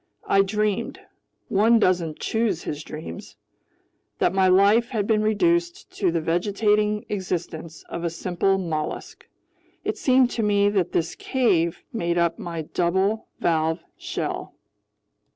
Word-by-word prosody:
I 195 - +4
dreamed—one 210 +1 0
doesn't 175 -7 +1
choose 220 -6 -1
his 150 +1 -5
dreams—that 150 - -7
my 190 -1 +3
life 200 +6 +4
had 215 -5 -1
been 215 0 +2
reduced 345 - 0
to 185 -4 +2
the 165 - 0
vegetating 210 +5 +1
existence 170 -5 -4
of 170 - -5
a 170 - 0
simple 180 +3 0
mollusk. 160 -5 -4 0.6
It - - -3
seemed 255 -2 +4
to 230 - -2
me 205 -1 +3
that 190 -4 0
this 165 0 0
cave 185 -10 0
made 170 -6 -1
up 170 -1 +1
my 165 -2 -4
double 190 +7 0
valved 160 0 0
shell. - - -4
195 Hz, 125 wpm, -24 LUFS, 170-215 Hz, 0.6 s, I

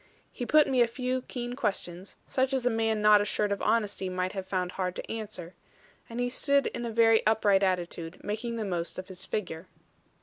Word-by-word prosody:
He 245 - -5
put 305 0 +6
me 260 -2 +2
a 235 - +5
few 255 +1 -2
keen 245 -1 -5
questions, 195 -6 -3
such 265 +1 0
as 260 -2 0
a 245 - +3
man 225 -1 0
not 210 -1 +7
assured 205 0 0
of 200 - -1
honesty 210 -4 0
might 185 0 -2
have 190 -2 -5
found 180 -2 -1
hard 185 -1 -3
to - - -6
answer; 205 -6 -5 0.6
and 230 +1 -5
he 245 - +1
stood 280 +2 +2
in 240 - -3
a - - -4
very 225 0 +5
upright 210 -3 +4
attitude, 175 -3 -1
making 225 +3 -3
the 225 -2 -2
most 175 -3 -3
of 185 +1 -7
his 190 0 -5
figure. 180 -4 -4
210 Hz, 205 wpm, -29 LUFS, 185-240 Hz, 0.6 s, not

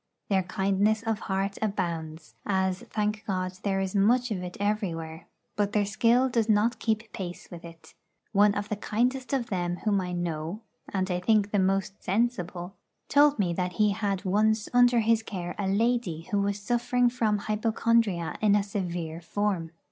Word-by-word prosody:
Their 195 -2 +3
kindness 195 +3 +1
of 225 -2 -1
heart 195 +1 -2
abounds 165 -6 -3
as, 190 -2 0
thank 210 0 -1
God, 185 -2 -1
there 195 -1 0
is 190 -1 -2
much 235 +5 +3
of 190 -4 -2
it 180 0 -7
everywhere 170 -6 -2 0.3
but 205 0 0
their 210 -1 +2
skill 235 +5 +3
does 230 -3 0
not 220 +2 +3
keep 220 -1 -2
pace 180 -2 -7
with 175 -1 -9
it. 165 -2 -13 0.4
One 205 0 +4
of 205 0 -3
the 210 - -1
kindest 250 +5 -1
of 255 -5 -1
them 175 -2 -1
whom 200 -2 +2
I 180 -1 -4
know, 170 +3 -3 0.3
and 190 -1 -1
I 180 - 0
think 210 +1 +2
the 205 - +2
most 195 +1 0
sensible, 190 -4 -1 0.3
told 290 0 +5
me 180 -4 +1
that 180 +1 -2
he 210 +3 +3
had 200 -2 -2
once 215 +3 +2
under 245 -1 +5
his 225 0 +3
care 180 -5 -5
a 200 - -1
lady 205 -4 +1
who 205 -1 +2
was 200 0 0
suffering 245 +3 +1
from 230 -4 +1
hypochondria 215 -3 0
in 210 -1 +4
a 205 - +2
severe 175 -5 -4
form. 190 -2 -1
200 Hz, 175 wpm, -27 LUFS, 180-220 Hz, 0.4 s, told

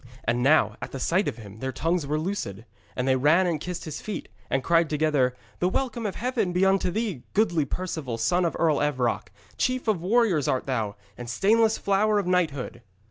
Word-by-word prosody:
And 120 +1 0
now 125 -6 +4
at 135 - -6
sight 180 +9 +1
of - - -3
him 105 -2 -11
their 130 +2 -3
tongues 165 +4 -1
were 150 +2 0
loosed, 155 - -4 0.3
and 125 +1 -1
they 130 - +4
ran 155 +8 +4
and 165 -4 -1
kissed 180 0 -5
his 155 -2 -6
feet, 215 - -5 0.2
and 135 -1 0
cried 165 0 +3
together: 150 -5 +1 0.2
'The 180 - +2
welcome 235 0 -1
of 195 - -5
Heaven 235 -6 -1
be 180 +2 +3
unto 190 -1 +2
thee, 205 - -2
goodly 170 -8 +2
Perceval, 150 -7 -4
son 145 +11 +2
of 170 - 0
Earl 160 -3 +2
Evroc! 130 -8 0 0.3
Chief 255 -1 0
of 205 -6 +1
warriors 190 - +2
art 130 - 0
thou, 110 -6 -2 0.2
and 120 -1 -6
stainless 220 - +3
flower 205 +2 +2
of 200 - 0
knighthood!' 155 -9 -1
165 Hz, 195 wpm, -26 LUFS, 130-195 Hz, 0.3 s, now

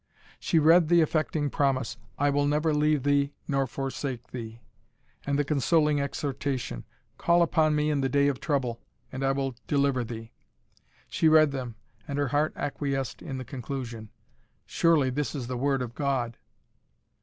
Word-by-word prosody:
She 170 - +1
read 165 +2 +6
the 170 +1 +5
affecting 155 -2 0
promise, 130 -4 0 0.2
"I 145 0 +2
will 145 0 +1
never 150 +2 +1
leave 150 -2 +2
thee 145 0 +2
nor 135 -1 +1
forsake 135 -1 -5
thee," 115 -2 -7 0.7
and 140 0 +1
the 145 - +2
consoling 150 +1 +2
exhortation, 140 - -3 0.3
"Call 170 0 +4
upon 155 -2 +2
me 150 0 +1
in 145 -2 0
the 135 - 0
day 140 +2 +3
of 140 -3 -1
trouble, 125 -5 -1 0.3
and 130 +1 -4
I 135 - +3
will 135 -1 -1
deliver 140 -3 +1
thee." 115 -1 -8 0.8
She 160 - +1
read 155 -2 +6
them, 125 -4 -5 0.3
and 140 - -3
her 145 -2 0
heart 150 +3 +1
acquiesced 140 -3 -3
in 135 -5 -5
the 130 - -6
conclusion. 120 -4 -6 0.6
Surely 155 -6 +2
this 140 -2 -2
is 130 -4 -4
the 125 +1 -4
word 135 +1 0
of 120 -1 -7
God! 130 -4 -1
140 Hz, 165 wpm, -27 LUFS, 130-150 Hz, 0.8 s, read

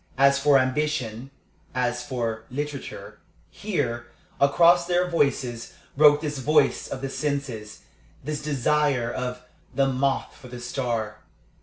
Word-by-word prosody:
As 140 +1 +5
for 140 0 +5
ambition, 130 -3 -1 0.5
as 125 -1 0
for 115 -3 -3
literature 145 +1 -6 0.3
here, 120 - -3 0.3
across 170 +5 +5
their 180 0 +2
voices, 130 -8 -1 0.2
broke 145 0 +6
this 150 -3 -3
voice 150 +1 +2
of 130 - -6
the 135 - -2
senses, 135 -8 -4 0.4
this 150 +1 -4
desire 145 -3 +1
of 125 -1 -4 0.3
"the 135 - +3
moth 135 +1 -1
for 125 - -13
the 125 0 -8
star." 120 -4 -3
135 Hz, 125 wpm, -25 LUFS, 120-150 Hz, 0.5 s, broke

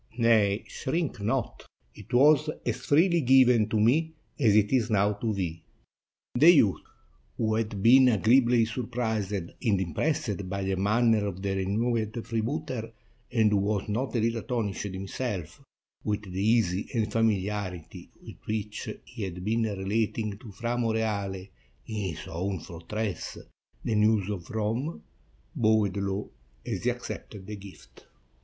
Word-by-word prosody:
"Nay, 110 -3 +3
shrink 150 -5 -3
not; 115 +4 -2 0.3
it - - -14
was 150 +4 +5 0.2
as - - 0
freely 170 +3 +3
given 125 -4 +5
to 110 - +1
me 160 +9 +2 0.2
as 110 -7 +4
it 105 -1 +4
is 125 -3 +2
now 105 -1 +3
to 110 +2 -2
thee." 90 -5 -3 0.7
The 150 +7 +6
youth, 125 - +5 0.6
who 110 -1 +1
had 110 -3 -2
been 130 +3 +7
agreeably 120 +1 +4
surprised 110 -3 -2
and 95 -4 -4
impressed 100 - -1
by 100 +1 -2
the 95 0 0
manner 110 +2 +2
of 95 -1 -6
the 100 -1 -1
renowned 110 +3 -1
freebooter, 115 0 -3 0.4
and 110 -4 +3
who 105 - +3
was 100 0 0
not 125 +6 -2
a - - +2
little 115 0 0
astonished 105 -5 -2
himself 95 -1 -5 0.4
with 105 0 -1
the 95 -1 -5
ease 110 -3 +3 0.2
and 110 -2 +2
famiharity 100 -5 -2
with - - -11
which 105 -1 -3 0.2
he 120 - -10
had 90 -2 -5
been 115 +2 +1
relating 105 +1 -1
to 115 -4 -11
Fra 120 +4 -3
Moreale, 105 -5 -1 0.4
in 110 - -6 0.2
his - - -9
own 95 +3 -3
fortress, 95 +6 -5 0.5
the - - 0
news 105 -1 +3
of 90 -5 -6
Rome, 115 +8 -2 0.5
bowed 110 -3 +2
low 100 +1 -3 0.3
as - - -4
he - - +4
accepted 95 -2 -6
the 105 +2 -6
gift. 95 -12 -14
110 Hz, 145 wpm, -28 LUFS, 100-115 Hz, 0.7 s, been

